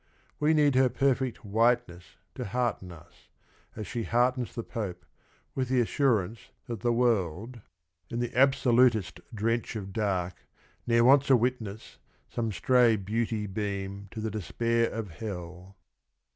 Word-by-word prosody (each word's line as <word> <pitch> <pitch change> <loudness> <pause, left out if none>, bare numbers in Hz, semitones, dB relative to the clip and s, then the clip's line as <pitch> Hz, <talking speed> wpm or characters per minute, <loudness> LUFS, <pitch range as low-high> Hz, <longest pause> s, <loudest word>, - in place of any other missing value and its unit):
We 155 +2 +3
need 145 -2 +4
her 130 0 +4
per 135 +2 +2
fect 125 -4 -5
whiteness 110 -6 0 0.2
to 125 - -5
hearten 115 -4 -2
us, 85 0 -16 0.5
as 110 - -5
she 120 +4 -4
heartens 125 +2 0
the 115 - -3
Pope, 105 -8 -5 0.5
with 130 -2 -2
the 130 -1 +2
assurance 115 -5 0 0.2
that 115 -3 -5
the 120 +2 +1
world 115 -1 0 0.5
"in 115 - -4
the 120 -1 -3
absolutest 125 -7 +3
drench 115 +1 -1
of 100 -3 -6
dark, 95 -4 -2 0.2
— - - -34
Ne'er 115 0 +4
wants 140 +2 +5
a 135 - +7
witness, 115 -4 -3 0.3
some 115 -2 -2
stray 120 +1 +4
beauty 110 +2 -2
beam 100 0 -4
To 110 - -7
the 110 0 -2
despair 115 +3 0
of 110 -5 -5
hell." 90 -2 -8
115 Hz, 145 wpm, -28 LUFS, 100-125 Hz, 0.5 s, a